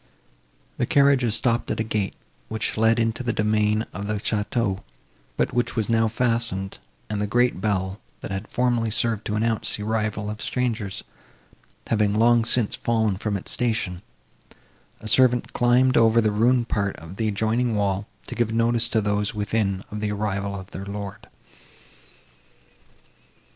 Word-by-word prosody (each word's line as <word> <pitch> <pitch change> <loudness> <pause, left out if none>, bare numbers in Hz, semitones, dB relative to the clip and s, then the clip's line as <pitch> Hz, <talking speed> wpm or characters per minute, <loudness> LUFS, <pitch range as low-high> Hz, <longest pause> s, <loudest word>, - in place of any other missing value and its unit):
The - - +1
carriages 140 -5 +4
stopped 115 0 0
at - - -2
a - - +2
gate, 105 -3 -2 0.3
which 110 -1 -2
led 115 +1 +3
into 115 +1 0
the 120 -2 0
domain 105 0 +1
of 100 +2 -5
the 105 - -1
château, 105 -1 -1 0.6
but - - 0
which 120 0 0
was 110 -2 -1
now 115 -1 +3
fastened; 115 -4 -1 0.3
and 105 -1 -3
the 105 - 0
great 120 -2 +2
bell, 95 -1 -1 0.2
that - - -6
had 95 +2 -4
formerly 120 -2 +1
served 115 -1 0
to 105 - -2
announce 110 0 +1
the 105 - -5
arrival 105 -1 -1
of 110 - -7
strangers, 115 -6 -2 0.8
having 105 -2 +1
long 115 +1 +4
since 115 -2 +2
fallen 110 -4 +1
from 100 0 -2
its 90 - -6
station, 110 -7 -1 1.0
a 110 - -8
servant 125 +1 +4
climbed 125 +2 +3
over 115 0 +5
a 110 -2 +4
ruined 120 +3 +2
part 100 -3 -1
of 80 +4 -11
the 110 - 0
adjoining 110 +3 0
wall, 100 -1 0 0.2
to - - -6
give 120 -2 0
notice 115 0 +2
to 115 -2 +1
those 105 0 -1
within 105 -2 -1
of 105 - -4
the 105 -1 -1
arrival 100 -1 -2
of 95 +2 -12
their 95 - -6
lord. 100 -1 -6
110 Hz, 160 wpm, -24 LUFS, 105-115 Hz, 1.0 s, over